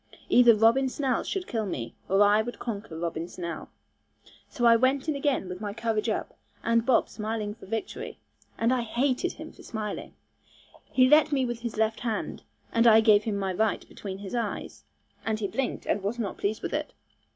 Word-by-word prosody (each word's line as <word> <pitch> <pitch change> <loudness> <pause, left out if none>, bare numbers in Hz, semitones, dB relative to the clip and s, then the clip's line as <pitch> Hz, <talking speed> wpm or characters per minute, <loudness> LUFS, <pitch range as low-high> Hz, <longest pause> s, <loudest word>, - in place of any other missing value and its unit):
Either 240 -2 +7
Robin 230 +5 +4
Snell 260 -2 0
should 385 -2 -3
kill 220 - -2
me, 115 -10 -4 0.2
or 195 +2 +5
I 205 +1 +5
would 240 +2 -6
conquer 205 -7 -5
Robin 165 0 -3
Snell. 170 -3 -6 0.8
So 240 - -1
I 230 0 +8
went 260 +4 +2
in 310 - 0
again 280 -8 0
with 180 +2 -7
my 205 -1 -4
courage 225 -1 -1
up, 215 - -3 0.3
and 230 0 +3
Bob 255 - +4
came - - -20
smiling 215 -1 -3
for 225 - -14
victory, 225 +2 -4 0.4
and 230 +2 +2
I 255 - +1
hated 255 +8 0
him 315 0 -9
for - - -16
smiling. 215 -3 -5 0.7
He 255 -1 +4
let 300 +2 +6
at - - -19
me 270 -3 +2
with 240 -1 -3
his 235 -2 -5
left 220 0 +1
hand, 230 -3 -3 0.3
and 230 +1 +4
I 220 -1 +8
gave 215 -2 +5
him 215 -3 -1
my 195 -1 -1
right 220 +3 0
between 190 -2 -7
his 195 +1 -8
eyes, 230 -4 -4 0.4
and 220 -1 -1
he 205 - -1
blinked, 270 +5 -3
and 205 - 0
was 205 +5 -2
not 220 -4 -4
pleased 215 +2 -1
with - - -3
it. - - -2
225 Hz, 205 wpm, -27 LUFS, 205-245 Hz, 0.8 s, I